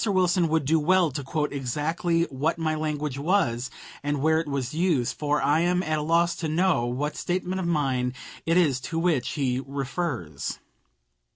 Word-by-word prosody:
Wilson 185 -4 +2
would 160 -2 +1
do 160 +3 +3
well 175 +1 +3
to 140 +2 -4
quote 150 +2 -2
exactly 155 +6 0
what 150 +5 0
my 160 -1 0
language 150 -3 -2
was, 135 -7 +1 0.3
and 145 0 -1
where 160 +3 +3
it 165 - -3
was 140 -3 -2
used, 160 -7 +1
for 150 0 0
I 145 +2 +3
am 180 +2 +2
at 155 -2 0
a - - -2
loss 170 +2 +2
to 165 - -2
know 160 -6 +2
what 140 +5 -2
statement 185 +1 -2
of 180 - -2
mine 130 -6 0 0.3
it 165 +1 +3
is 145 -8 +3
to 160 - -5
which 165 -7 +1
he 130 -3 0
refers. 135 - -3
155 Hz, 180 wpm, -26 LUFS, 135-170 Hz, 0.3 s, do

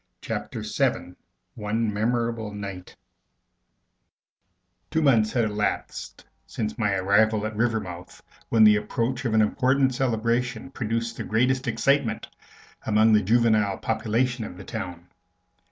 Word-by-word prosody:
Chapter - - -5
Seven 90 - -1 0.4
One 110 0 -2
Memorable 115 0 -1
Night 100 -3 -7 1.9
Two 160 - 0
months 115 -7 +4
had 120 -3 +2
elapsed 105 - -3 0.2
since 110 -1 -4
my 105 -4 0
arrival 105 +3 +2
at 110 0 -4
Rivermouth, 105 -6 -3 0.3
when 115 -1 +5
the 105 -1 +7
approach 120 +4 -2
of 110 -2 +1
an 110 - +5
important 130 +4 +2
celebration 120 0 -1
produced 115 -2 -3
the - - -4
greatest 125 +4 +1
excitement 120 +2 +1 0.6
among 110 +1 +4
the 105 - +5
juvenile 110 -2 +2
population 115 +2 -1
of 90 -4 -8
the 100 - -9
town. 90 -6 -6
110 Hz, 120 wpm, -25 LUFS, 105-120 Hz, 1.9 s, the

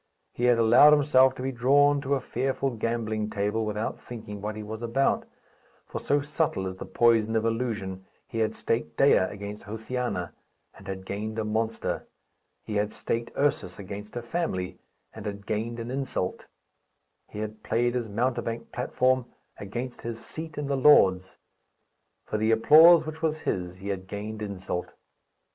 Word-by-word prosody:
He 120 - -1
had 120 -1 +5
allowed 120 +6 +7
himself 130 -3 +5
to 125 - -6
be 135 - -1
drawn 140 +4 +4
to 140 0 +1
a - - 0
fearful 135 +1 -1
gambling 110 -2 -2
table, 105 +2 -1
without 105 +1 -3
thinking 110 -4 -8
what 105 +1 -4
he 110 - -6
was 110 +1 -7
about; 120 +4 +1 0.6
for, - - -5
so 145 0 +1
subtle 145 -8 -1
is 95 0 -5
the - - -7
poison 115 -2 +3
of 110 0 +1
illusion, 105 -5 -2 0.2
he 115 - -5
had 110 -1 0
staked 115 - -2
Dea 140 - +6
against 100 +2 -3
Josiana, 110 -4 -3 0.4
and 95 - -15
had 95 -1 -5
gained 110 +3 -4
a 110 - -1
monster; 110 +1 -2 0.6
he 105 - -3
had 105 +1 0
staked 115 +2 -3
Ursus 140 -10 0
against 100 +2 -8
a 120 - -4
family, 120 - -3 0.3
and 110 -1 -7
had 100 -1 -6
gained 115 +2 -2
an 115 +1 -5
insult; 130 -8 -3 0.8
he - - -10
had 110 0 -5
played 120 +2 +1
his 120 -3 -2
mountebank 115 +1 -2
platform 125 0 +1 0.3
against 120 +5 -6
his 115 -1 -5
seat 160 -1 -7
in 150 - -2
the 140 0 0
Lords; 95 -10 +5 0.9
for 105 - -2
the 110 +1 +1
applause 155 +9 +7
which 155 0 -7
was 155 -1 0
his 90 -1 -2
he 95 +2 -7
had 95 -1 -4
gained 105 +2 -6
insult. 95 -3 -4
115 Hz, 165 wpm, -27 LUFS, 105-130 Hz, 0.9 s, allowed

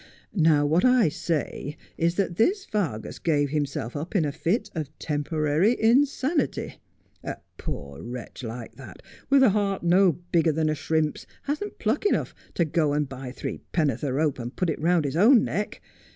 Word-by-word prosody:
Now 155 -5 +4
what 160 +5 +2
I 250 -8 +5
say 150 -1 -3 0.2
is 170 +1 +1
that 175 -3 -1
this 385 - +2
Vargas 160 - -3
gave 145 -4 +1
himself 140 -5 -2
up 155 +8 -5
in 170 -6 +3
a 145 - -1
fit 180 - -1
of 155 -5 -4
temporary 155 - +1
insanity. 270 +5 +1 0.4
A - - -4 0.2
poor 70 0 -6
wretch 120 +2 -7
like 115 -1 -7
that, - - -12 0.3
with 275 -1 +6
a 240 - +6
heart 200 -2 0
no 180 +1 +5
bigger 170 0 +1
than 155 0 +1
a - - +1
shrimp's, 155 0 -1 0.2
hasn't 305 +9 -3
pluck 225 - 0
enough - - 0 0.2
to 170 - +2
go 155 -1 +1
and 150 -1 0
buy 130 -1 -7
three - - -5
penn'orth 145 -8 +1
of 135 -3 -1
rope 150 -2 +1
and 120 +1 -6
put 180 -3 0
it 150 - -5
round 170 -1 +3
his 140 - -2
own 225 +7 +6
neck. 210 +1 -3
160 Hz, 180 wpm, -26 LUFS, 145-205 Hz, 0.4 s, with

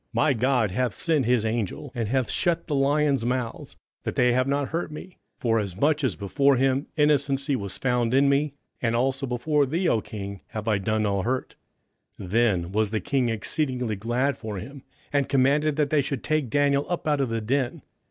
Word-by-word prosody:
27:006:022 - - -47
My 155 - +3
God 120 -3 +1
hath 125 +2 0
sent 155 -6 +1
his 120 -3 +2
angel, 115 +4 -2
and 115 -4 -2
hath 130 +1 0
shut 170 -1 0
the 150 - -3
lions' 140 -1 +2
mouths, 125 -1 -3 0.3
that - - -4
they 125 0 +4
have 130 +1 +2
not 140 0 0
hurt 170 +2 -2
me: 175 +4 -10 0.2
forasmuch 115 - +1
as 120 -10 +1
before 135 - +2
him 135 +2 +1
innocency 140 -2 +2
was 100 -5 -5
found 125 -3 +1
in 135 +2 +4
me; 140 +1 +1 0.3
and 115 -1 +1
also 135 +3 0
before 140 +4 +1
thee, 170 +6 0
O 115 -8 +2
king, 100 -2 -7
have 110 0 -6
I 105 -3 +2
done 110 +2 0
no 100 -2 0
hurt. 130 +5 -2 0.7
27:006:023 90 - -7
Then 100 -6 +2
was 105 +1 +1
the 110 0 -1
king 125 +4 0
exceedingly 125 0 -2
glad 120 +7 -1
for 110 -3 -5
him, 135 +8 -8 0.3
and 140 -2 +1
commanded 140 +3 +3
that 150 -1 0
they 150 -2 +4
should 135 -2 -4
take 155 -5 0
Daniel 140 +2 +2
up 175 -3 -2
out 145 -2 +2
of 130 - 0
the 115 0 -1
den. 125 +3 -1
130 Hz, 200 wpm, -25 LUFS, 115-140 Hz, 0.7 s, they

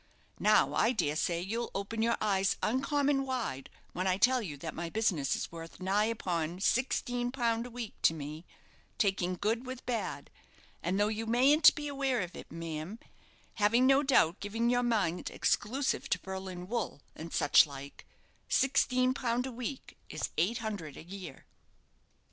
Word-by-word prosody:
Now, - - +4
I 235 - +3
dare 150 -10 0
say 170 +1 0
you'll 225 +6 -3
open 200 +3 -3
your 235 +1 +2
eyes 195 -2 +1
uncommon 275 +3 +1
wide 245 - -3 0.2
when 185 +1 -1
I 185 0 +2
tell 255 +4 +4
you 155 -9 -6
that 155 +3 -6
my 170 -1 -4
business 175 - +1
is - - -4
worth 165 0 -9
nigh 195 +3 +2
upon 180 -6 -2
sixteen 245 +2 0
pound 235 -2 0
a - - -10
week 240 -2 -6
to 165 - +4
me, 155 +2 -7 0.5
taking 190 -3 +1
good 225 +6 -1
with 260 0 -7
bad; 240 -2 -3 0.5
and 185 +3 -1
though 205 - +3
you 220 +1 -3
mayn't 270 +7 +6
be 295 0 -4
aware 270 -4 0
of 180 -1 -6
it, - - -10
ma'am, 165 +4 -5 0.6
having, 225 +4 +3
no 270 +1 +5
doubt, 235 - +3
given 225 +4 0
your 245 0 +3
mind 210 -8 0
exclusive 260 +6 0
to 185 - +1
Berlin 190 -2 -6
wool, 215 - -3
and 165 +1 -8
such 145 - +5
like, 140 0 -10 0.4
sixteen 255 -1 +3
pound 245 -2 -1
a 265 - -4
week 250 +3 -6
is - - -4
eight 190 +9 +1
hundred 175 -10 -5
a - - -9
year." 180 -4 -9
215 Hz, 165 wpm, -31 LUFS, 175-245 Hz, 0.6 s, mayn't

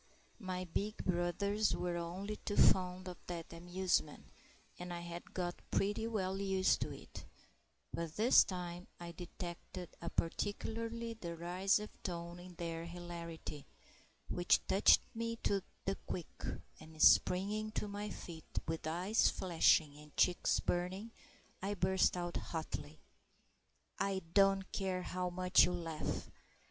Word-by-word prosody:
My 185 -3 -3
big 205 +5 -2
brothers 190 +4 +1
were 175 -1 -1
only 185 +5 -4
too 205 - -4
fond 185 0 +4
of 180 -2 -7
that 170 -2 -5
amusement, 175 -2 -1 0.5
and 180 0 -5
I 175 0 -4
had 170 0 -7
got 175 -1 -2
pretty 205 +3 +1
well 195 -4 -1
used 190 -1 +2
to - - -1
it; - - -9 0.7
but 165 -2 -3
this 230 +4 +7
time 180 -1 -5
I 170 0 -6
detected 175 0 -7
a 170 - -3
particularly 230 +6 -2
derisive 185 +2 0
tone 170 -1 -4
in 180 0 -11
their 165 -1 -4
hilarity, 170 -3 -7 0.6
which 175 0 +3
touched 195 - +6
me 230 0 -2
to 200 -1 +2 0.2
the 195 0 0
quick, 175 - -5 0.3
and 155 0 -13
springing 205 +7 +5
to 210 - -2
my 205 +1 -4
feet, 165 -5 -9
with 160 -1 -2
eyes 180 +7 +3
flashing 160 -4 +3
and 150 -1 -15
cheeks 180 -1 +3
burning, 185 +5 -1 0.5
I 200 +2 -1
burst 190 0 +3
out 175 0 -2
hotly,— 75 - -5 1.0
"I 195 -2 0
don't 195 -1 +5
care 185 -2 -1
how 180 0 -2
much 180 +1 +5
you 180 - -1
laugh. 165 -3 -3
180 Hz, 135 wpm, -36 LUFS, 170-195 Hz, 1.0 s, this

